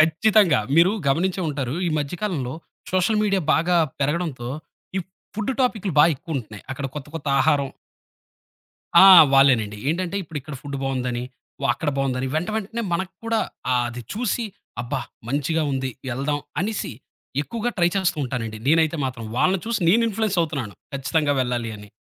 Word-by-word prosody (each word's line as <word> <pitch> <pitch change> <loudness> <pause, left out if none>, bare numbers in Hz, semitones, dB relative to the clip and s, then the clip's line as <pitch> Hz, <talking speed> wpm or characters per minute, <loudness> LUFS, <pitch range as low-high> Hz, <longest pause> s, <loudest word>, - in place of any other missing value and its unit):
ఖచ్చితంగా. 170 - +4 0.2
మీరు 175 +4 +6 0.2
గమనించే 180 +7 +1
ఉంటారు. 135 -2 -3
ఈ - - -1
మధ్య 145 +3 -3
కాలంలో 145 -12 -2 0.4
సోషల్ 185 +4 +2
మీడియా 200 -2 +2
బాగా 175 +2 +2 0.2
పెరగడంతో 145 -4 -1 0.5
ఈ - - +1 0.3
ఫుడ్డు 215 +5 -1
టాపికు‌లు 215 - 0
బా - - +8
యెక్కువుంటున్నాయి. 130 - -6
అక్కడ 135 +1 -4
కొత్త 145 -1 -6
కొత్త 155 - -9
ఆహారం 145 -3 +2 1.4
ఆ! - - +10 0.3
వాళ్ళేనండి. 125 -7 +4
ఏంటంటే 180 +3 -1
ఇప్పుడిక్కడ 150 -2 -7
ఫుడ్డు 140 -1 -5
బావుందని. 125 -2 -2 0.4
వ - - -5
అక్కడ 145 +5 -2
బావుందని 130 -1 0
వెంట 175 +6 -1
వెంటనే 220 +2 -3
మనకి 190 +2 -2
కూడా 230 -1 +1 0.3
ఆహ్, 125 -1 +2
అది 120 +1 -7
చూసి 235 +1 -1 0.4
అబ్బా! 120 - -3 0.3
మంచిగా 150 +4 0
ఉంది 130 -1 -1 0.2
ఎళ్దాం 145 +3 -1 0.2
అనేసి 205 -5 -2 0.5
ఎక్కువగా 235 +7 -3
ట్రై 175 -1 +4
చాస్తూ 190 -4 +1
ఉంటానండి. 115 -4 -4
నేనైతే 160 +1 +3
మాత్రం. 120 -3 -5
వాళ్ళని 185 +3 +2
చూసి 235 -2 0
నేను 225 +6 +5
ఇన్‌ఫ్లూయెన్స్ 210 -2 -1
అవుతున్నాను 140 - -3 0.2
ఖచ్చితంగా 145 +2 +1
వెళ్ళాలి 120 -2 -2
అని. 105 0 -13
150 Hz, 150 wpm, -23 LUFS, 130-185 Hz, 1.4 s, ఆ